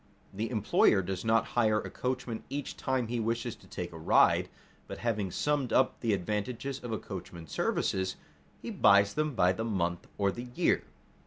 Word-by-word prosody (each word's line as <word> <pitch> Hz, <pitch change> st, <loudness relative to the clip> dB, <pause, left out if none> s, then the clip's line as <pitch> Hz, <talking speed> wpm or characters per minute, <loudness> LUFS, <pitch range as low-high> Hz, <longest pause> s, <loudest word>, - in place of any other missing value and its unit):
The 110 Hz, +4 st, -2 dB
employer 105 Hz, -3 st, +3 dB
does 95 Hz, 0 st, -4 dB
not 115 Hz, 0 st, +2 dB
hire 110 Hz, -3 st, +3 dB
a -, -, -6 dB
coachman 125 Hz, -3 st, -3 dB
each 140 Hz, 0 st, -4 dB
time 130 Hz, -2 st, -1 dB
he 120 Hz, +1 st, -2 dB
wishes 115 Hz, +1 st, -1 dB
to -, -, -19 dB
take -, -, -5 dB
a 80 Hz, -, -9 dB
ride, 80 Hz, -, +4 dB, 0.4 s
but -, -, -6 dB
having 105 Hz, -5 st, -1 dB
summed 145 Hz, +4 st, 0 dB
up 130 Hz, -, +3 dB
the 115 Hz, -3 st, +1 dB
advantages 110 Hz, +8 st, -2 dB
of 120 Hz, -, -5 dB
a 110 Hz, -, 0 dB
coachman's 85 Hz, -5 st, -8 dB
services, 95 Hz, -1 st, 0 dB, 0.5 s
he -, -, -4 dB
buys 100 Hz, 0 st, +5 dB
them 155 Hz, -3 st, -1 dB
by 90 Hz, -3 st, +4 dB
the 110 Hz, -, -3 dB
month 90 Hz, -6 st, -1 dB
or 100 Hz, -1 st, +2 dB
the 120 Hz, +4 st, -7 dB
year. -, -, +2 dB
110 Hz, 180 wpm, -30 LUFS, 95-120 Hz, 0.5 s, buys